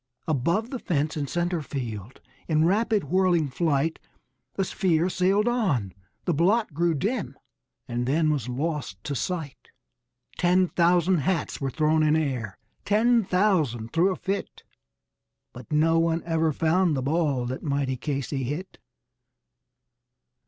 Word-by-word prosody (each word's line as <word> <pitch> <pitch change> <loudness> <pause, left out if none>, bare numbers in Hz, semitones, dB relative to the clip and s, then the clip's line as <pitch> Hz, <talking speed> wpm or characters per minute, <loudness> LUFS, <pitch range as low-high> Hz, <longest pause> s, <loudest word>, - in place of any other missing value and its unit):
Above 170 - 0
the 260 - -4
fence 155 -5 -1
in 145 -2 -2
center 175 +2 -1
field, 120 -6 -6 0.3
in 155 -1 +3
rapid 210 +3 +2
whirling 175 0 +2
flight 160 +1 0 0.6
The 195 - +1
sphere 175 -2 +1
sailed 195 +5 +2
on; 165 - 0 0.3
the 175 - +1
blot 190 +5 +2
grew 170 +2 +1
dim 205 - -2 0.5
and 120 +1 -2
then 155 +3 +2
was 135 -5 -2
lost 135 - -3
to 145 - -3
sight. 155 0 -4 0.7
Ten 180 +1 +3
thousand 175 +1 +3
hats 165 +1 -1
were 135 - -1
thrown 155 +3 +2
in 155 0 +3
air, 125 -11 -2 0.3
ten 230 +3 +3
thousand 165 - +1
threw 170 +4 +3
a - - -2
fit; 195 +1 -4 0.9
But 125 +2 -12
no 165 +2 +3
one 165 0 +1
ever 160 -1 +1
found 165 +1 +2
the 130 - -2
ball 145 -3 0
that 130 +2 -4
mighty 140 -3 -1
Casey 135 +1 -3
hit! 145 +9 -5
160 Hz, 140 wpm, -26 LUFS, 140-180 Hz, 0.9 s, in